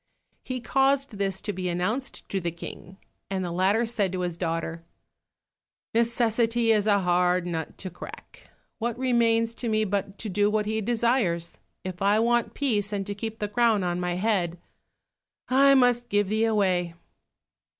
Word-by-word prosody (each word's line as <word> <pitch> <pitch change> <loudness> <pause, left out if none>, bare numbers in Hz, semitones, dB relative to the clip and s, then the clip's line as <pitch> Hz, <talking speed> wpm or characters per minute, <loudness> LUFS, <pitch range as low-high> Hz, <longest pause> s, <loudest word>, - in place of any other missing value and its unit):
He 255 -1 -4
caused 270 +2 +2
this 195 -1 -1
to 205 0 -3
be 185 -1 -3
announced 205 +10 -3
to 195 - -1
the 170 - -1
King, 170 +2 -9 0.3
and 190 -1 -2
the 175 - -4
latter 195 +6 +2
said 210 -5 0
to 185 - -2
his 175 -2 -2
daughter, 165 -1 -3 1.1
"Necessity 230 0 +2
is 210 -1 +2
a 200 -2 +4
hard 180 0 +2
nut 165 -2 -4
to 185 - -6
crack, 175 - -11 0.3
what 235 0 -2
remains 230 -3 +2
to 235 0 -4
me 215 0 +2
but 200 0 -2
to 225 - -5
do 205 +1 +2
what 210 0 0
he 220 +1 -1
desires? 225 -7 0 0.2
If 185 0 -6
I 200 +2 +4
want 235 +1 +1
peace 215 -7 0
and 200 -2 -2
to 205 - -4
keep 220 +2 -5
the 210 - -2
crown 220 -1 +2
on 175 0 -1
my 180 -1 -1
head, 180 -4 0 0.9
I 275 +2 +6
must 245 -2 +3
give 205 -1 +1
thee 220 +1 +2
away." 185 -6 +1
205 Hz, 170 wpm, -26 LUFS, 180-230 Hz, 1.1 s, I